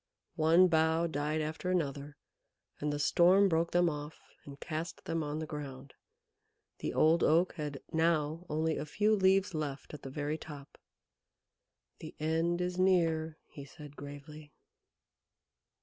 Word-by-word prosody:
One 165 +4 +5
bough 160 0 +2
died 150 0 -1
after 155 +4 -4
another, 145 -5 -2 0.6
and 150 0 -1
the 145 - -2
Storm 180 +6 +5
broke 165 -1 +1
them 175 0 +3
off 150 -1 -5 0.3
and 140 -1 -11
cast 165 +2 -5
them 165 0 -1
on 150 0 -3
the 160 - -3
ground. 140 -3 -8 0.9
The - - -3
Old 160 +2 +3
Oak 170 +4 +3
had 150 -4 -6
now 160 0 +1
only 160 +1 0
a 145 - -3
few 210 +7 +2
leaves 190 0 +3
left 150 -3 -5
at 150 - -8
the 135 - -7
very 150 +3 -3
top. 145 -3 -11 1.2
"The 155 - -9
end 165 +3 0
is 180 0 -2
near," 165 -4 +2
he 140 - -11
said 145 +1 -12
gravely. 145 +1 -10
155 Hz, 145 wpm, -32 LUFS, 145-170 Hz, 1.2 s, One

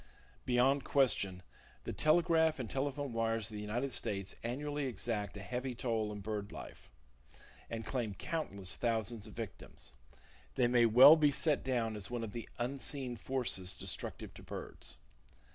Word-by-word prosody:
Beyond 130 +3 +3
question, 100 -9 +2 0.4
the - - -4
telegraph 160 0 +3
and 125 -4 -4
telephone 140 +1 -2
wires 115 -1 0
of - - -7
the 105 - -4
United 120 +6 -2
States 100 -5 -1
annually 145 +4 -2
exact 105 -5 -3
a 100 - -7
heavy 125 +3 -3
toll 115 -3 -1
in 105 -1 -6
bird 105 -1 -4
life, - - -10 0.8
and 115 -1 -4
claim 115 -6 -2
countless 100 - -3
thousands 115 -2 -1
of 105 - -12
victims. 100 - -8 0.6
They - - +3
may 120 -1 +5
well 125 +7 +10
be 150 -2 +4
set 150 0 +1
down 120 -4 0
as 105 -3 -6
one 120 -1 -3
of 110 - -5
the 115 +1 -7
unseen 130 0 -1
forces 120 -8 0
destructive - - -3
to - - -12
birds. - - -6
120 Hz, 155 wpm, -34 LUFS, 105-135 Hz, 0.8 s, well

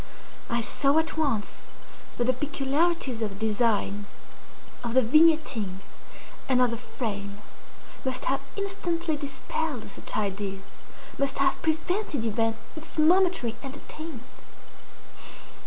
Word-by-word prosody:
I 235 0 +1
saw 275 +5 +3
at 320 0 +2
once 275 -10 -1 0.5
that 240 - +2
the 255 - +4
peculiarities 280 -1 +1
of 205 -3 -2
the 220 +1 0
design, 205 -2 +1 0.8
of 235 0 -2
the 260 - +7
vignetting, 280 - +4 0.7
and 255 -1 +4
of 250 -2 +4
the 235 - -2
frame, 205 -5 -4 0.6
must 260 -1 -1
have 270 +1 +1
instantly 350 -5 -1
dispelled 285 -2 -3
such - - -5
idea—must 200 +7 -3
have 275 - +2
prevented 320 - 0
even 225 0 +1 0.2
its 315 +1 -7
momentary 340 -6 +4
entertainment. 285 0 -6
260 Hz, 110 wpm, -28 LUFS, 225-315 Hz, 0.8 s, the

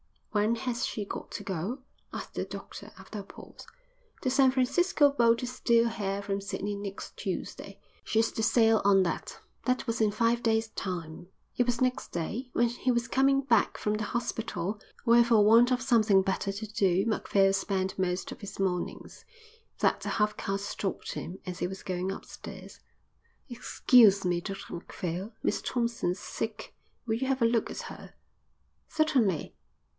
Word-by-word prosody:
"When 215 +2 +2
has 240 0 -2
she 215 - -3
got - - -6
to - - -5
go?" 195 - -3 0.3
asked - - -7
the - - -2
doctor, - - -9
after 210 - -8
a - - -6
pause. - - -13 0.6
"The 255 - +2
San 265 0 +5
Francisco 285 +4 +3
boat 235 -2 +3
is 250 +1 -5
due 235 -1 +4
here 200 -3 -3
from 200 0 -2
Sydney 200 +1 -3
next 200 -1 -7
Tuesday. - - -5 0.2
She's 225 0 +1
to - - -3
sail 225 0 +4
on 195 -1 +6
that." 170 - -4 0.3
That 255 0 +1
was 230 0 -2
in 215 - +4
five 230 +3 +1
days' 225 -1 +1
time. 175 -4 -5 0.3
It 245 - +3
was 245 0 -1
next 255 0 +1
day, 220 +10 -3
when 240 0 +3
he 245 +2 -1
was 235 -1 0
coming 275 +1 +3
back 235 -6 +2
from 210 0 -1
the 210 0 -2
hospital 210 -4 -3 0.2
where 235 0 +6
for 230 -3 +4
want 230 +3 +7
of 255 -1 +1
something 220 -7 +4
better 195 +1 -1
to 205 +2 -5
do 195 -3 +2
Macphail 200 -3 +2
spent 195 -1 -1
most 180 0 -1
of - - -8
his 200 - -8
mornings, 185 -2 -3 0.5
that - - +2
the - - -4
half 210 -1 +1
caste 195 +1 -2
stopped 200 -1 -4
him 185 +3 -6
as 180 -2 -6
he - - 0
was 190 +1 -8
going 185 0 -2
upstairs. 195 - -9 0.7
"Excuse 235 -4 +5
me, 175 -1 +1
Dr 195 +1 -7
Macphail, 180 +4 -5
Miss - - 0
Thompson's 235 -7 -1
sick. 220 +1 -5 0.3
Will 220 -2 0
you 260 +3 -2
have 265 -1 0
a - - +5
look 230 0 +2
at - - -5
her." - - -10 0.7
"Certainly." 260 - +1
220 Hz, 170 wpm, -29 LUFS, 195-240 Hz, 0.7 s, want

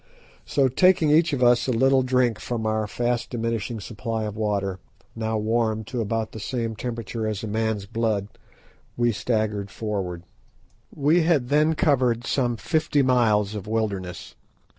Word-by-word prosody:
So 140 -2 +3
taking 160 +3 +4
each 160 +2 +4
of 135 -3 0
us 120 +1 +4
a - - +1
little 130 +3 +4
drink 125 -3 +1
from 115 0 -3
our 110 -1 0
fast 120 +2 -1
diminishing 115 -2 -3
supply 110 +2 -4
of 105 -1 -4
water, 100 -3 -1 0.4
now 110 -1 -1
warmed 110 0 0
to 120 - 0
about 110 0 -2
the 110 - -8
same 115 +1 -3
temperature 115 -1 -4
as 105 -1 -3
a - - -3
man's 110 -1 -1
blood, 110 -2 -1 0.7
we 120 0 +3
staggered 105 -3 -1
forward. 95 -6 -4 0.7
We 155 +5 +3
had 155 -7 +2
then 150 +2 +3
covered 125 -6 +2
some 120 -4 0
fifty 155 0 +1
miles 110 -5 +2
of 105 -1 -6
wilderness. 100 -5 -3
115 Hz, 155 wpm, -24 LUFS, 105-125 Hz, 0.7 s, taking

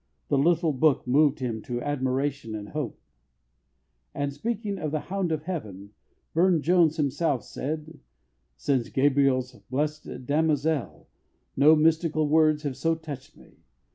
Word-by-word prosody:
The 140 - +2
little 165 +1 +2
book 140 +1 +2
moved 140 +2 +3
him 115 -3 -2
to 120 +1 -4
admiration 135 -3 -2
and 105 -1 -7
hope." 150 -7 -4 1.2
And, 140 0 -2
speaking 205 +4 -3
of 155 - -2
The 155 +1 -1
Hound 190 -2 -2
of 155 -1 -2
Heaven, 105 - -6 0.4
Burne 170 -2 +3
Jones 170 -2 +3
himself 145 -2 0
said: 155 +2 -5 0.6
"Since 130 -4 0
Gabriel's 135 -2 +2 0.2
'Blessed 145 -2 -3
Damozel' 150 0 0 0.5
no 150 +4 +6
mystical 155 0 +2
words 155 0 +3
have 140 -4 -3
so 165 +4 +1
touched 150 -5 -9
me. - - -19
150 Hz, 135 wpm, -26 LUFS, 130-160 Hz, 1.2 s, no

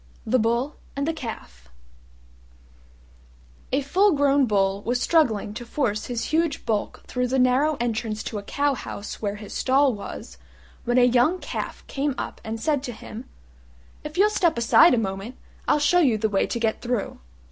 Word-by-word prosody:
THE 250 +3 +2
BULL 235 +6 0 0.2
AND 280 +1 -2
THE 325 - 0
CALF 65 - -8 2.0
A 270 - +2
full 375 +8 +3
grown 280 -2 +3
Bull 195 -2 +1
was 245 +3 -1
struggling 235 -11 +2
to 240 - -6
force 235 -4 -2
his 235 -2 -3
huge 320 -2 0
bulk 215 -2 -2
through 250 0 -1
the 260 +2 0
narrow 260 +4 +3
entrance 225 -2 -2
to 215 - -4
a - - -7
cow 285 +7 0
house 205 -5 -7
where 205 -1 -2
his 210 0 -9
stall 270 0 +3
was, 205 - -8 0.5
when 240 +1 +1
a 250 - +6
young 250 +8 +3
Calf - - -6
came 280 0 -2
up - - -5
and 220 +1 -5
said 290 +2 0
to 255 -3 -5
him, 220 +2 -9 0.8
"If 300 +3 -7
you'll 415 +3 +4
step 345 - +2
aside 235 +5 +6
a - - -1
moment, 200 +3 -3 0.3
I'll - - +4
show 300 +4 +3
you 260 -10 +3
the 220 +1 0
way 195 -1 +1
to 235 - -3
get 225 -1 0
through." 245 -4 -3
245 Hz, 180 wpm, -24 LUFS, 220-285 Hz, 2.0 s, a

